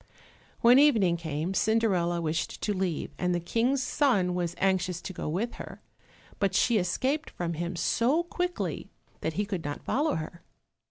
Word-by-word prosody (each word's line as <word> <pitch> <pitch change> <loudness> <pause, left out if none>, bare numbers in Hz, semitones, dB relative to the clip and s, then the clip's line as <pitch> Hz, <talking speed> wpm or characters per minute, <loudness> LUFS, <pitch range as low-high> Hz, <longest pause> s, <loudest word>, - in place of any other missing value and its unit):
When 245 +3 +7
evening 220 -12 +4
came, 160 +1 -3
Cinderella 190 -5 +2
wished 160 +1 -2
to 210 - +1
leave, 185 -4 -2
and 180 -1 +1
the - - 0
King's 245 +9 0
son 205 -14 +2
was 175 -1 -2
anxious 185 -2 +1
to 190 - -7
go 160 - -4
with 205 +9 -2
her, - - -9 0.6
but 195 -2 +1
she 230 +1 +3
escaped 260 - -1
from 170 -1 -3
him 170 +2 -3
so 240 - +2
quickly 355 +1 -3 0.3
that 160 - -2
he 205 +5 -1
could 190 -5 -4
not 145 0 -5
follow 295 +3 +1
her. 160 +2 -6
185 Hz, 165 wpm, -28 LUFS, 170-235 Hz, 0.6 s, When